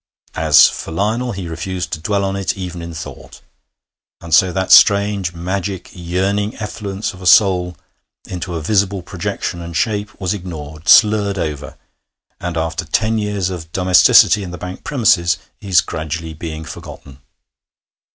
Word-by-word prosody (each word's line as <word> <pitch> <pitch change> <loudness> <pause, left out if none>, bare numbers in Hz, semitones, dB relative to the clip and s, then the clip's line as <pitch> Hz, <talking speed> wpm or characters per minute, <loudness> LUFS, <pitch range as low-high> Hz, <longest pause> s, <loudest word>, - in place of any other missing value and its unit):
As - - +6
for - - -6
Lionel, 110 +8 -1
he 95 -3 -6
refused 90 +2 -5
to 80 - -3
dwell 100 +4 -1
on 95 0 -2
it 100 0 -2
even 90 -2 -6
in 85 0 -7
thought. 80 - -10 0.8
And 85 -1 -7
so 90 +4 +5
that 95 0 -2
strange, 100 -3 +5
magic, 95 +1 -4
yearning 95 +4 -2
effluence 105 -1 -5
of 95 - -13
a 90 - -3
soul 90 -4 +4 0.5
into 90 -1 -5
a 80 - -3
visible 100 0 0
projection 95 -1 -4
and 85 -1 -5
shape 105 -2 -2
was 95 -1 -1
ignored, 80 -5 -8
slurred 105 -2 +5
over, 75 -5 -5 0.6
and, 90 -1 -4
after 80 +3 -2
ten 110 +6 0
years 100 -3 -2
of 80 -3 -7
domesticity 95 +3 +5
in 95 - -6
the 90 - -7
bank 90 +2 -8
premises, 100 - +2 0.2
is 95 -3 +3
gradually 80 +1 -5
being 80 0 -7
forgotten. 65 -2 -11
90 Hz, 150 wpm, -17 LUFS, 85-100 Hz, 0.8 s, As